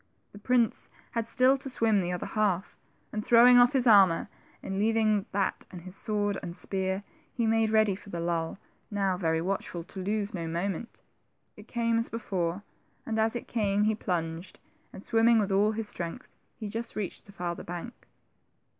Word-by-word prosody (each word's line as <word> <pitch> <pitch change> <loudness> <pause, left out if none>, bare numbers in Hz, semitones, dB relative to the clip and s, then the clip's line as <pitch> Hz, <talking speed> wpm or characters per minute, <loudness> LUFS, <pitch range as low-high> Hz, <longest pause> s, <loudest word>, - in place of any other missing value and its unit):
The 205 - -12
prince 240 0 +1 0.2
had 230 -1 -2
still 255 +3 +4
to 270 0 -2
swim 225 -4 +3
the 180 -1 -1
other 180 - -3
half, 205 -4 -1 0.4
and 215 0 -2
throwing 245 +2 +7
off 245 +3 +5
his 260 -2 +2
ai'mor, 195 -7 +5 0.3
and 195 0 -3
leaving 215 -1 +2
that 195 -1 -1
and 180 - -9
his 185 +1 -8
sword 205 -2 -1
and 170 +1 -6
spear, 190 0 -2 0.3
he 235 - -1
made 225 0 +2
ready 215 -2 +3
for 200 - -13
the 175 - -4
lull, 170 0 -2 0.3
now 195 -3 0
very 160 -3 0
watchful 180 -1 -3
to 190 - -9
lose 205 +2 -2
no 170 -3 -4
moment. 180 +6 -4 0.5
It - - -14
came 230 -1 +1
as 230 - -2
before, 190 -4 -3 0.4
and 220 -1 -2
as 220 +2 +1
it 240 - -5
came, 205 -3 +1
he 215 +1 +3
plunged, 170 -4 -4 0.3
and 190 - -10
sWimming 230 0 +4
with 200 -2 0
all 205 +2 +3
his 220 0 -3
strength 170 -1 -6 0.3
he 215 - -5
just 225 +3 -5
reached 205 -4 -4
the - - -12
farther 175 -3 -4
bank. 175 +8 -8
205 Hz, 180 wpm, -28 LUFS, 185-225 Hz, 0.5 s, throwing